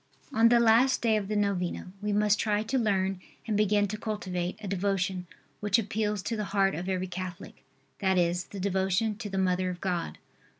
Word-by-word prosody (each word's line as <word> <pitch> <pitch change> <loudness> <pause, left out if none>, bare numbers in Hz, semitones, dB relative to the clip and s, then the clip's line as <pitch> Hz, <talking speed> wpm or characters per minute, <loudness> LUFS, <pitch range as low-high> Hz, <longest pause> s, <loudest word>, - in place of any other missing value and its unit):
On 230 -1 +5
the 240 0 +5
last 235 +3 +4
day 225 -2 +3
of 205 -2 -1
the 215 - -2
novena 190 -3 -1
we 210 0 -1
must 210 0 +3
try 210 -1 +1
to 260 +4 0
learn 195 -4 0 0.2
and 220 -2 -1
begin 205 0 +3
to 215 +1 -4
cultivate 185 -5 -3
a 210 - -7
devotion, 190 -1 -1 0.3
which 205 +1 +2
appeals 210 -2 -1
to 230 - -2
the 210 -1 -2
heart 195 0 +4
of 180 +4 -4
every 185 -1 -1
Catholic, 185 -1 -7 0.4
that 190 -1 +2
is, 175 0 +1
the 200 - -9
devotion 190 +3 +1
to 215 -2 -6
the 195 - -3
Mother 185 -1 +1
of 180 -1 -5
God. 180 -3 -2
200 Hz, 200 wpm, -28 LUFS, 185-215 Hz, 0.4 s, On